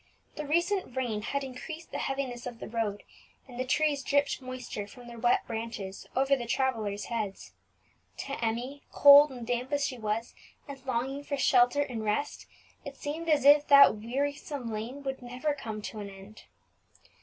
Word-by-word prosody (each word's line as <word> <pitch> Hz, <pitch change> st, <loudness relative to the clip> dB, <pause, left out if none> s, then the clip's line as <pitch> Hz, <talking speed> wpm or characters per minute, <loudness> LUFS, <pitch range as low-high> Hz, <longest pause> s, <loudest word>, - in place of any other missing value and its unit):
The 300 Hz, -, -5 dB
recent 345 Hz, -1 st, 0 dB
rain 230 Hz, -5 st, -1 dB
had 280 Hz, +6 st, -2 dB
increased 290 Hz, +5 st, -8 dB
the -, -, -4 dB
heaviness 260 Hz, -3 st, -3 dB
of 240 Hz, -2 st, -7 dB
the -, -, -8 dB
road, 215 Hz, -3 st, -2 dB, 0.4 s
and 245 Hz, -2 st, -10 dB
the -, -, +1 dB
trees 290 Hz, +2 st, +1 dB
dripped 285 Hz, 0 st, +1 dB
moisture 255 Hz, -5 st, -6 dB
from 245 Hz, +3 st, -13 dB
their 235 Hz, -1 st, -10 dB
wet 240 Hz, +1 st, +2 dB
branches 225 Hz, -4 st, -6 dB
over 270 Hz, +1 st, +3 dB
the 240 Hz, -3 st, -5 dB
travellers' 225 Hz, -6 st, -1 dB
heads. 215 Hz, -5 st, -4 dB, 0.7 s
To 275 Hz, -, -7 dB
Emmie, 245 Hz, +5 st, -2 dB
cold 285 Hz, +1 st, +9 dB
and 245 Hz, -3 st, -7 dB
damp 245 Hz, +3 st, -2 dB
as 285 Hz, -1 st, +1 dB
she 255 Hz, -3 st, -4 dB
was, 220 Hz, +1 st, -2 dB, 0.3 s
and 275 Hz, -2 st, -9 dB
longing 265 Hz, +3 st, -2 dB
for 285 Hz, 0 st, -3 dB
shelter 255 Hz, +2 st, +4 dB
and 235 Hz, -5 st, -5 dB
rest, 215 Hz, +8 st, -2 dB, 0.4 s
it -, -, -8 dB
seemed 320 Hz, +3 st, -4 dB
as 290 Hz, -3 st, +3 dB
if 290 Hz, +1 st, +7 dB
that 280 Hz, -6 st, +8 dB
wearisome 270 Hz, +1 st, -3 dB
lane 240 Hz, +7 st, -5 dB
would 270 Hz, -1 st, -4 dB
never 250 Hz, +5 st, -2 dB
come 220 Hz, -6 st, -6 dB
to 215 Hz, -, -6 dB
an 200 Hz, -1 st, -6 dB
end. 195 Hz, +2 st, -13 dB
255 Hz, 175 wpm, -29 LUFS, 230-280 Hz, 0.7 s, cold